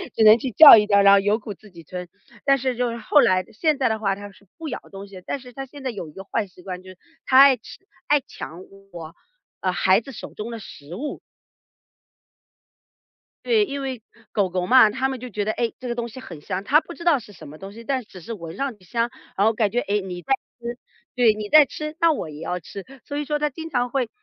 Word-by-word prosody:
只 220 - +3
能 215 +1 +8
去 255 +2 -4
叫 295 +1 +11
一 210 -1 +2
叫， 200 -1 +5
然 200 0 +7
后 200 - +7
有 205 +3 +1
苦 210 -1 -7
自 210 +1 -19
己 170 -1 -13
吞。 180 +2 -8 0.3
但 275 0 +4
是 260 -1 -2
就 245 0 -1
是 230 - -5
后 285 +5 +4
来 185 -6 +3
现 305 +5 +1
在 270 - +2
的 220 - -1
话 195 -2 0
它 205 +1 -10
是 200 - -22
不 325 -1 -7
咬 250 - -4
东 195 +1 -9
西， 190 -2 -12
但 280 - -3
是 250 -1 -14
它 270 +2 -6
现 280 +1 -13
在 260 - -2
有 195 -8 -6
一 - - -14
个 190 +5 -10
坏 205 +1 -2
习 180 -1 -18
惯， 180 -1 -6
就 185 - -13
是 185 - -16 0.3
它 260 - +3
爱 275 -1 +8
吃 225 - -13 0.3
爱 295 - +4
抢 175 -7 -9 0.3
我， 165 0 -9 0.5
呃， 185 - 0
孩 185 +3 +3
子 270 - -11
手 235 - -9
中 215 +3 -6
的 230 - -6
食 155 -5 -11
物。 290 +8 -5 2.3
对， 450 -3 +3
因 280 -6 -5
为， 260 -4 -5 0.3
狗 200 -3 +1
狗 180 0 -2
嘛， 255 -4 +7
它 260 +5 -1
们 265 -1 -5
就 250 +1 -8
觉 205 -2 -3
得， 215 - 0
哎， 235 -2 -1
这 255 - -7
个 240 - -2
东 235 0 -4
西 245 - -10
很 165 -11 -10
香， 190 +3 -4
它 290 +9 +4
不 345 - -10
知 340 - -11
道 325 -6 +4
是 210 - -14
什 200 - -13
么 150 +2 -11
东 195 +4 -9
西， 230 +3 -12
但 265 -1 -1
只 195 -3 -13
是 230 +7 -7
我 215 - -9
闻 165 - -10
上 275 -5 -3
去 190 - -24
香， 230 +6 -1 0.3
然 200 +2 +4
后 225 - +3
感 215 -2 0
觉， 245 - +1
哎， 210 -3 0
你 180 -2 -7
在 270 - 0 0.3
吃 240 0 -6 0.4
对， 240 -3 +4
你 210 0 -6
在 305 -1 +8
吃 305 +3 -6
那 335 -1 +5
我 275 - -3
也 150 0 -10
要 180 - -3
吃。 195 +3 -10 0.2
所 285 - -5
以 295 - -1
说 295 +1 -1
它 300 0 0
经 320 +4 -8
常 245 -4 0
会 250 -2 -1
225 Hz, 285 characters per minute, -23 LUFS, 195-265 Hz, 2.3 s, 叫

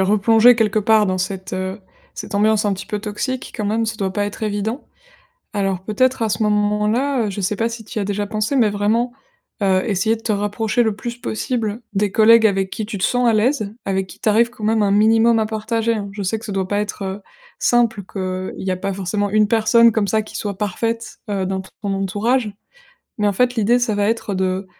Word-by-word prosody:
replongée 220 +4 +5
quelque 215 -1 +2
part 215 0 +4
dans 185 - 0
cette, 185 0 -4
heu, 185 +2 -3 0.4
cette 200 - -7
ambiance 215 +1 +3
un 205 - +2
petit 190 - -8
peu 210 - -3
toxique, 225 +5 -4
quand 215 - -3
même, 220 +2 0
ça 220 - -2
doit 195 -3 -2
pas 205 +1 0
être 205 - -8
évident. 215 +4 -2 0.7
Alors, 195 -3 -1
peut-être 250 +5 +1
à 225 - +1
ce 215 - -1
moment-là, 210 +5 +1
heu, - - -3
je 200 - -5
sais 195 +2 -1
pas 230 0 0
si 230 -1 -7
tu 215 - -6
y - - 0
as - - -2
déjà 205 +1 -2
pensé, 215 +6 -1
mais 225 -4 +4
vraiment, 220 +4 0 0.5
heu, 190 -1 +3
essayer 220 +2 +1
de 225 - -14
te 220 - 0
rapprocher 210 +3 0
le 220 -3 0
plus 235 +3 -6
possible 225 -1 -3
des 200 0 0
collègues 225 0 +6
avec 195 -2 0
qui 215 - -4
tu 205 -2 -5
te 185 - -1
sens 245 0 +2
à 230 - +4
l'aise, 215 -1 +1
avec 190 -1 -1
qui - - -14
tu - - 0
arrives 230 +3 +3
quand 225 -3 -9
même 220 0 +2
un 200 - +2
minimum 225 +3 +4
à 220 - +1
partager, 225 +1 -1
hein. 200 -2 -4
Je 205 0 -5
sais 205 +4 -1
que 225 - -13
ça 210 - -5
doit 190 -1 -2
pas 205 0 0
être, 210 0 -4
heu, 190 +1 -5 0.4
simple, 235 -4 +2
qu'il 185 -1 -4
y 185 - 0
a 185 - 0
pas 195 +2 -3
forcément 200 +2 -2
une 215 0 +3
personne 230 +1 +5
comme 210 -3 0
ça 220 - +2
qui 215 - -8
soit 200 -2 -4
parfaite, 225 +2 -3
heu, 190 -2 -1
dans 190 0 -2
ton 195 +1 -5
entourage. 210 +4 0 0.7
Mais, 210 - +1
en 205 - +1
fait, 250 +3 +2
l'idée, 235 +1 +3
ça 240 -4 0
va 205 +1 +1
être 225 -2 -1
de, 185 +1 -1
210 Hz, 235 wpm, -20 LUFS, 200-225 Hz, 0.7 s, collègues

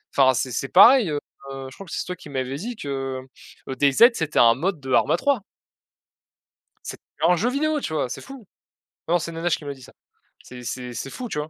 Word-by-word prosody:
Enfin 130 -1 +5
c'est 130 +1 -2
c'est 135 +4 -3
pareil, 230 +2 +7
heu, 145 -1 -1 0.5
je 130 - -14
crois 195 - -10
que 175 - -13
c'est - - -3
toi 180 - -5
qui 160 - -13
m'avait 130 -1 -3
dit 225 - -6
que, 145 - -8 0.8
heu, 135 - -4
Day 140 +2 +3
Z 235 - +7
c'était 160 -8 -1
un 115 -1 +6
mode 170 +5 -2
de 130 -2 -4
ARMA - - +3
3. 280 -6 +1 1.4
C'ét - - -7 0.2
un 175 +2 +5
jeu 225 +8 0
vidéo, 300 +3 0
tu 160 - -5
vois? 145 -5 -1
C'est - - -6
fou, 270 -7 -12 0.6
non 175 +2 +2
c'est 170 - -5
Nanashe 165 +1 -1
qui 150 - -13
m'a 140 - -4
dit 135 - -17
ça. 125 - -14 0.5
C'est 125 -1 -11
c'est 125 0 -5
c'est 130 +4 -5
fou, 250 - -6
tu 150 - -4
vois? 150 +1 -5
155 Hz, 230 wpm, -23 LUFS, 130-205 Hz, 1.4 s, pareil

